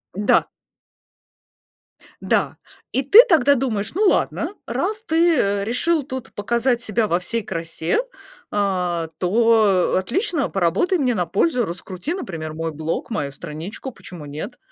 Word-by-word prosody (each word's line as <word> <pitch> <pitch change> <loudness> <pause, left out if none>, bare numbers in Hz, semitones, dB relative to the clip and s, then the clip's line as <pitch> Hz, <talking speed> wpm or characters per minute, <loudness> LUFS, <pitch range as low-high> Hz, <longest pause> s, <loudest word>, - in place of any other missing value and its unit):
Да. 205 +1 +3 1.7
Да. - - 0 0.3
И 265 - +1
ты 425 - +9
тогда 285 - +4
думаешь: 225 -4 -2
"Ну, 420 - +1
ладно, 385 - 0
раз 430 +1 -2
ты, 330 +1 +3
э, 200 -1 +1
решил 295 +7 +1
тут 260 -2 -7
показать 235 +3 0
себя 215 -1 0
во 175 -1 +1
всей 230 +5 -1
красе, 165 - -2 0.5
а, 180 -5 -1
то, 210 -1 +3
э, - - +3
отлично, 300 - -1
поработай 195 - +1
мне 250 -4 +1
на 180 -2 0
пользу, 240 - +1
раскрути, 185 - -5
например, 165 - -5
мой 165 0 -3
блог, 160 +7 -4
мою 145 -11 -3
страничку, 170 - -7
почему 175 -8 -11
нет?" 155 - -7
210 Hz, 140 wpm, -21 LUFS, 175-265 Hz, 1.7 s, ты